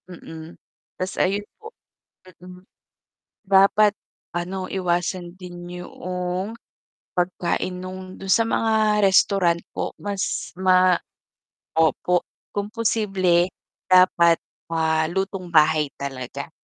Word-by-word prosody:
Mm, 165 -2 -10 0.4
tas 185 0 -3
ayun 200 +2 0 0.2
po, 445 - -9 0.7
mm. 180 0 -12 0.9
Dapat 200 +2 +5 0.4
ano 185 +2 -3
iwasan 175 -1 -1
din 180 -1 -9
yung 180 +2 -4 0.6
pagkain 180 0 -1
nung 185 +1 -8
dun 195 0 -2
sa 230 - +5
mga 215 -2 +2
restaurant 190 -3 +4
po - - -3
mas 200 -1 -3
ma 185 -1 +4 0.8
opo, 160 +2 +2 0.3
kung 205 0 -2
posible 195 -6 +1 0.4
dapat, 175 -2 +6 0.3
ah, 160 -1 +1
lutong 190 0 -3
bahay 155 -2 +4
talaga. 140 +2 -6
185 Hz, 95 wpm, -23 LUFS, 175-195 Hz, 0.9 s, dapat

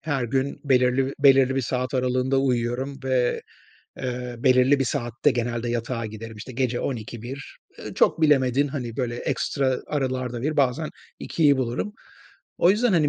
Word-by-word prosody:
her 140 -5 -1
gün 135 +3 -1
belirli 130 0 +2
belirli 135 -2 +5
bir - - +2
saat 125 +2 -2
aralığında 130 +1 +1
uyuyorum 130 +1 -1
ve, 130 -2 +1 0.6
eee, 125 -1 -4
belirli 130 +2 +4
bir 135 - +1
saatte 125 +1 0
genelde 120 -1 -2
yatağa 115 0 -2
giderim. 110 +1 -8
İşte 120 +5 -9
gece 125 -1 -1
00.00-01.00 120 +2 -6 0.4
çok - - +3
bilemedin, 140 -2 +3
hani, 125 -5 -5
böyle, 120 -3 -2
ekstra 130 +1 -1
aralarda 130 -4 -2
01.00'i, 155 +3 -1
bazen 140 +3 +1 0.3
02.00'i 145 -4 +2
bulurum. 130 - -2 0.7
O 175 - +5
yüzden, 220 +3 +2
hani, 155 -5 +3
130 Hz, 145 wpm, -24 LUFS, 120-140 Hz, 0.7 s, belirli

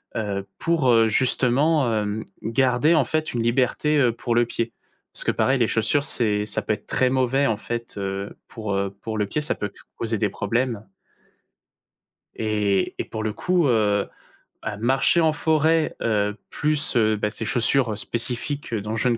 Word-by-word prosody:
Heu, 100 -3 -2
pour 130 -9 +3
justement, 130 +4 +2
hem, 105 +1 -3 0.2
garder, 130 +7 +2
en 150 - +4
fait, 155 +3 -2
une 120 - -1
liberté, 130 +5 +1
heu, 125 -3 +4
pour 120 0 -2
le 120 0 +4
pied. 115 0 -3 0.4
Parce - - -2
que - - +3
pareil, 130 0 +1
les 115 - +3
chaussures, 140 +6 +1
c'est 105 -3 +1
ça 105 - -1
peut 110 - -1
être - - -7
très 130 -1 +2
mauvais, 130 +2 +2
en 110 - 0
fait, 120 -1 -5
heu, 100 0 -4
pour, 110 -3 -5
heu, 100 0 -2
pour 110 -1 -4
le 105 - +1
pied, 150 - -2
ça 150 - -1
peut 105 -1 -4 0.3
causer 115 -1 -1
des 105 -2 +1
problèmes 115 +2 -2 1.5
et 105 -3 0
et - - -1
pour 110 - -5
le 110 -1 -1
coup, 180 - +1
heu, 105 -3 +2 0.5
bah, 105 - -4
marcher 135 +8 +3
en 160 -1 +3
forêt, 160 +1 +2
heu, 105 -2 +1
plus, 150 -2 0
heu, 110 -2 +3
bah 105 0 -1
ces 110 0 -5
chaussures 120 -2 +1
spécifiques 125 +5 -2
dont 110 +1 -2
je 125 +3 +1
ne 115 - +1
115 Hz, 180 wpm, -23 LUFS, 105-135 Hz, 1.5 s, en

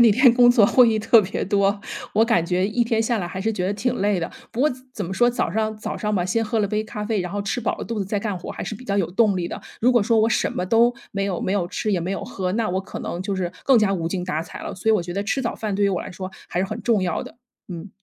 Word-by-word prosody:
那 235 -2 +7
天 250 +3 +6
工 245 -1 +7
作 225 -4 +5
会 250 +1 +6
议 220 - +1
特 220 0 +5
别 190 - -3
多， 200 +1 +1 0.3
我 225 - +4
感 230 -8 +2
觉 180 +2 +1
一 235 +3 +1
天 230 -1 +1
下 225 0 +1
来 175 - -2
还 190 +1 -5
是 220 +3 0
觉 180 -3 -2
得 195 - 0
挺 240 +5 -1
累 200 -1 +1
的。 165 - -2 0.2
不 240 - -4
过 300 - +5 0.2
怎 210 -6 -4
么 190 - -4
说， 240 +4 +4
早 240 - -1
上 215 +3 -1
早 215 - -5
上 210 0 -2
吧， 180 -3 +1
先 225 +5 0
喝 220 +1 -1
了 205 - +2
杯 215 +2 -1
咖 210 -1 -6
啡， 215 -2 0
然 180 - -4
后 205 - -2
吃 205 +5 -2
饱 - - -1
了 - - -6
肚 230 -2 -3
子 195 - -1
再 205 +2 -1
干 205 -2 -3
活 175 - -7
还 - - -5
是 215 - -4
比 255 - -11
较 200 -2 0
有 175 - +1
动 210 -2 +3
力 175 -1 -2
的。 - - -6 0.2
如 250 +3 +4
果 240 -4 +4
说 225 +1 +2
我 225 - +3
什 - - 0
么 180 - -2
都 235 +3 +4 0.2
没 195 0 -1
有 190 -3 -2
没 190 - -1
有 180 -4 0
吃， 210 +2 -2
也 180 - +1
没 175 +3 -3
有 195 - -3
喝， 185 -1 -3
那 220 +2 0
我 185 +1 0
可 195 - -8
能 175 +2 -4
就 195 0 -2
是 180 -1 -2
更 265 -4 +6
加 195 -2 +2
无 165 -2 -2
精 180 0 -3
打 165 -3 -2
采 - - -10
了。 - - -6
所 185 +4 -3
以 - - +6
我 215 - +3
觉 175 0 -5
得 200 - -1
吃 245 +6 -1
早 235 - -2
饭 215 -2 -3
对 205 - +2
于 - - +4
我 185 -3 -1
来 - - -8
说 185 +1 -6 0.2
还 175 - -3
是 190 - +1
很 - - -6
重 230 -4 +2
要 180 -3 -1
的， - - -12 0.3
嗯。 175 +2 -7
205 Hz, 355 characters per minute, -23 LUFS, 185-225 Hz, 0.3 s, 那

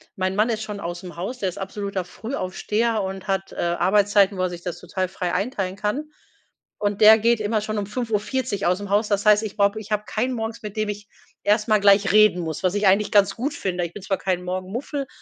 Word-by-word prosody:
mein 185 +1 -1
Mann 215 +3 +3
ist 220 -1 -1
schon 210 -1 -6
ausm 175 -1 -6
Haus, 240 +9 -5
der 190 - 0
ist - - -9
absoluter 195 -1 -4
Frühaufsteher 220 +1 -2
und 190 0 -6
hat, 195 -1 -1
äh, - - -11
Arbeitszeiten, 195 +3 +3
wo 185 - 0
er 185 - +1
sich 175 -1 -8
das 175 -1 -5
total 185 +1 -3
frei 180 -2 -3
einteilen 195 -4 -2
kann 210 +10 -2 0.7
und 205 0 -1
der 220 +1 +9
geht 235 +1 +3
immer 215 +1 0
schon 215 +1 -3
um 205 - -1
5:40 225 0 -2
ausm 190 +3 0
Haus. 210 +2 +2
Das 205 0 0
heißt, 210 0 +5
ich 215 0 -6
brauche 200 +1 +2
ich 215 0 -11
habe 210 0 0
keinen 245 +5 -1
morgens, 225 0 -4
mit 210 0 -7
dem 215 0 0
ich 205 0 -6 0.4
erst 210 +2 +2
mal 215 - +5
gleich 200 -1 +5
reden 215 -4 +5
muss, 160 +1 -5
was 185 +1 +1
ich 205 -1 +2
eigentlich 200 +2 +3
ganz 200 -2 +4
gut 275 +6 -2
finde. 180 -8 -2
Ich 170 - -8
bin 205 - -9
zwar 195 0 -1
kein 180 -2 -2
Morgenmuffel, 205 +10 -4
205 Hz, 230 wpm, -23 LUFS, 190-215 Hz, 0.7 s, der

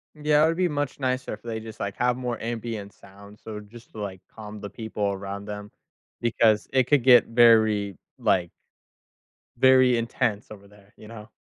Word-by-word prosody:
Yeah, 150 0 +3
it 160 - +5
would 165 +1 -1
be 185 - +2
much 145 -3 -3
nicer 130 -2 -2
if 105 - -9
they 115 -1 -5
just, 110 0 -10
like, 100 -1 -4
have 125 0 +1
more 125 -2 -3
ambient 115 -3 -5
sound, 100 +1 -16
so 110 -1 -8
just 115 +3 -15
to, 110 - -10
like, 95 -2 -6
calm 105 -1 -9
the 100 - -7
people 110 -1 -4
around 100 +1 -6
them 105 0 -7 0.5
because 110 -2 +2
it 130 -2 +3
could 145 -4 +3
get 125 -2 +6
very, 110 -4 +4 0.2
like 90 -3 +1 1.1
very 130 -1 +5
intense 115 -2 -2
over 100 -2 -12
there, 100 0 -21
you 110 - -14
know? 110 -2 -11
110 Hz, 185 wpm, -25 LUFS, 105-125 Hz, 1.1 s, get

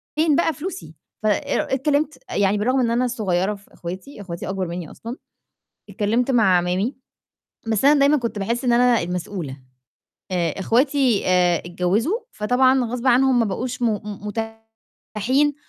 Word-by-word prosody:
فين 310 -2 +3
بقى 325 -1 +2
فلوسي؟ 250 - -7 0.3
فأ 215 - +3 0.5
اتكلّمت، 290 +1 0
يعني 200 +1 +2
بالرغم 255 +6 +1
إن 235 -2 +1
أنا 245 +2 +2
الصغيّرة 205 -4 0
في 200 - -20
اخواتي، 190 +8 -8
اخواتي 175 -1 -6
اكبر 190 -2 -2
مني 170 -2 -6
أصلًا، 235 +3 -8 0.7
اتكلّمت 235 +5 0
مع 215 -7 +4
اعمامي، 180 +8 0 0.7
بس 220 +3 +1
أنا 290 0 +6
دايمًا 285 +2 +5
كنت 230 -4 -3
باحس 235 +6 -2
إن 240 - +3
أنا 245 -1 +4
المسؤولة، 175 -5 -4 0.7
آآ 175 -1 -1
اخواتي 255 +1 +2
آآ 180 -2 +3
اتجوّزوا، 200 - 0
فطبعًا 255 +3 +2
غصب 245 +2 -3
عنهم 255 0 +4
ما 230 - +3
بقوش 245 +5 -4
م - - +2
م 210 -1 -5 0.9
متاحين 270 +7 +2
230 Hz, 150 wpm, -22 LUFS, 190-260 Hz, 0.9 s, أنا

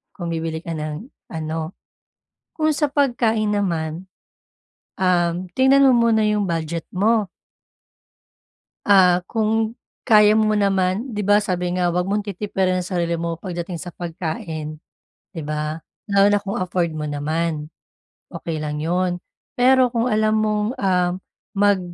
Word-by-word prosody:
Kung 175 -3 -5
bibili 160 0 -3
ka 170 - -5
ng 155 +7 -5 0.2
ano 160 0 -4 0.8
kung 310 -1 +2
sa 295 0 +1
pagkain 230 -7 +1
naman, 170 -2 -2 0.9
um, 180 -1 +1
tingnan 270 +1 +5
mo 255 - +5 0.2
muna 220 -1 +3
yung 210 -1 +1
budget 165 0 -3
mo. 210 +1 +2 1.6
Ah, 180 -3 +5
kung 220 +1 0 0.3
kaya 210 -1 +6
mo 215 -1 +3
naman, 195 +3 +1
'di 210 - -1
ba, 205 +1 +4
sabi 180 -2 -2
nga, 180 -1 +1
huwag 180 +1 0
mong 205 +2 0
titipirin 190 -2 -1
ang - - -9
sarili 170 -2 -1
mo 165 0 -3
pagdating 175 -2 -5
sa 180 - -6
pagkain. 160 -2 -5 0.5
'Di 165 -4 -6
ba, 150 +1 -3 0.3
lalo 200 0 +5
na 205 0 +2
kung 200 0 -4
afford 175 -2 -1
mo 155 -1 -4
naman, 150 +1 -2 0.6
okey 165 -2 -4
lang 150 0 -3
'yon. 175 +2 0 0.4
Pero 255 +1 +5
kung 235 +1 +1
alam 215 0 +2
mong 210 -1 0
um, 180 -2 +2 0.4
mag 200 -1 +3
185 Hz, 140 wpm, -21 LUFS, 165-210 Hz, 1.6 s, kaya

